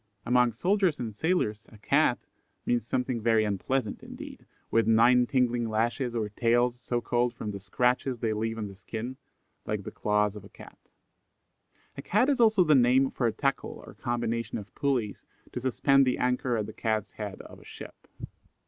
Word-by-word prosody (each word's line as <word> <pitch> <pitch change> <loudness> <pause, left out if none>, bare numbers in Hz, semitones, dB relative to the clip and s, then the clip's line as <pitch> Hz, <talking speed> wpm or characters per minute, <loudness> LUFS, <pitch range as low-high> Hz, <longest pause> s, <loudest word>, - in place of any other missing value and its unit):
Among 125 0 +3
soldiers 180 - +1
and 115 -3 -5
sailors 110 - -1
a 110 - -15
"Cat" 105 - +1 0.4
means 120 -2 0
something 125 -2 -1
very 110 -1 +3
unpleasant 105 +3 -2
indeed, - - -10 0.2
with 115 -1 +3
nine 120 +2 +5
tingling 120 -3 +1
lashes 120 +3 -1
or 110 -2 -1
tails, 120 +3 +1
so 120 -1 -2
called, 120 0 0
from 105 -3 -5
the 100 - -6
scratches 125 +6 0
they 110 -1 -1
leave 115 +1 -2
on 105 -2 -3
the 100 - -10
skin, 110 +6 -6 0.5
like 105 -1 -2
the - - -7
claws 105 -1 0
of 105 - -9
a - - -13
cat. - - -14 1.2
A - - -4
Cat 240 +8 +2
is 275 -3 +1
also 220 -5 +5
the 155 -3 +4
name 130 +1 +4
for 120 - 0
a - - +1
tackle 135 +5 -2
or - - -12
combination 115 -1 -2
of 105 -1 -10
pulleys, 130 -8 -1 0.3
to - - -4
suspend 135 +2 +3
the 125 - +1
anchor 125 -1 0
at 105 - -1
the 110 - -9
cat's 110 -3 -2
head 105 -3 -7
of - - -13
a - - -17
ship. - - -12
120 Hz, 185 wpm, -28 LUFS, 110-125 Hz, 1.2 s, nine